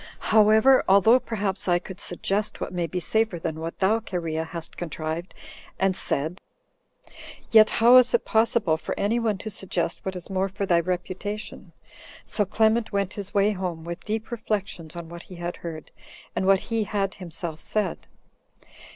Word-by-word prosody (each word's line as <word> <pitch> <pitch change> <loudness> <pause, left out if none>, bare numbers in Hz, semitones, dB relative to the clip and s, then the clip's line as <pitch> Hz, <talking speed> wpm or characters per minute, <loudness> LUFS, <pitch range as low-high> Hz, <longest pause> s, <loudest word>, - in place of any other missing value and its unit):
"However, 220 +5 +5
although 200 +6 +6
perhaps 205 -5 -3
I 175 -1 +4
could 185 +1 -9
suggest 200 +4 -2
what - - -4
may 175 -2 -1
be 180 - -3
safer 220 +1 0
than 160 -1 -4
what 165 +1 -5
thou, 210 +4 +2
Cherea, 165 -6 -3
hast 165 0 -7
contrived 160 +1 -5 0.4
and 190 -1 +2
said, 160 +5 -1 1.1
yet 220 -1 +8
how 240 +3 +6
is 250 -1 +6
it - - 0
possible 220 -6 +2
for - - -5
any 220 +4 +1
one 220 -4 0
to 215 - -6
suggest 180 -3 -2
what 190 -1 -4
is 180 - -6
more 190 0 -1
for 195 +1 -3
thy 175 -3 +3
reputation?" 185 +4 -4 0.5
So 205 - +1
Clement 220 +3 +2
went 200 -2 -1
his 200 -1 -7
way 200 +1 +4
home, 180 -5 -4
with 170 +1 -6
deep 220 +2 -3
reflections 200 -8 -3
on 170 -1 -7
what 170 +1 -9
he 185 - -12
had 175 0 -5
heard, 160 -2 -8 0.4
and 190 - 0
what 195 -1 +5
he 225 -2 -1
had 195 -1 -1
himself 165 -3 -6
said. 210 -5 -2
190 Hz, 170 wpm, -25 LUFS, 170-215 Hz, 1.1 s, yet